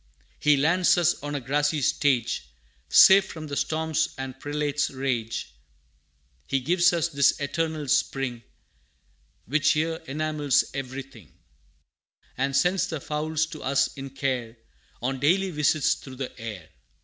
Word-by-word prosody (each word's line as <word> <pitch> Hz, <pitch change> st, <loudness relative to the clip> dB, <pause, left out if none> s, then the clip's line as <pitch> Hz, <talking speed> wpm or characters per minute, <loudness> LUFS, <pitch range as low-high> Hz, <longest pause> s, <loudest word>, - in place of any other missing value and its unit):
He 150 Hz, -1 st, +4 dB
lands 175 Hz, +7 st, +3 dB
us 175 Hz, -2 st, +2 dB
on 145 Hz, 0 st, -4 dB
a -, -, -1 dB
grassy 145 Hz, +4 st, 0 dB
stage, 120 Hz, -, +1 dB, 0.4 s
Safe 195 Hz, -, +8 dB
from 160 Hz, -3 st, -8 dB
the 145 Hz, -2 st, -5 dB
storms 160 Hz, +1 st, 0 dB
and 135 Hz, 0 st, -6 dB
prelates' 145 Hz, 0 st, -1 dB
rage; 120 Hz, -, -3 dB, 0.9 s
He 135 Hz, -, +1 dB
gives 175 Hz, +6 st, +3 dB
us 170 Hz, -1 st, 0 dB
this 140 Hz, -3 st, +2 dB
eternal 155 Hz, +1 st, -2 dB
spring, 130 Hz, -2 st, 0 dB, 1.0 s
Which 155 Hz, +6 st, +2 dB
here 160 Hz, +1 st, -1 dB
enamels 150 Hz, -1 st, +1 dB
everything, 135 Hz, -, -7 dB, 1.0 s
And 135 Hz, +1 st, -1 dB
sends 180 Hz, +4 st, +2 dB
the 160 Hz, -3 st, -4 dB
fowls 155 Hz, +2 st, -1 dB
to 155 Hz, -, -8 dB
us 140 Hz, +1 st, +1 dB
in 135 Hz, 0 st, -7 dB
care, 130 Hz, -4 st, -3 dB, 0.5 s
On 135 Hz, +1 st, -1 dB
daily 185 Hz, +7 st, +2 dB
visits 150 Hz, -2 st, +2 dB
through 130 Hz, -1 st, -10 dB
the 130 Hz, 0 st, -6 dB
air. 105 Hz, -8 st, -7 dB
145 Hz, 135 wpm, -25 LUFS, 135-155 Hz, 1.0 s, Safe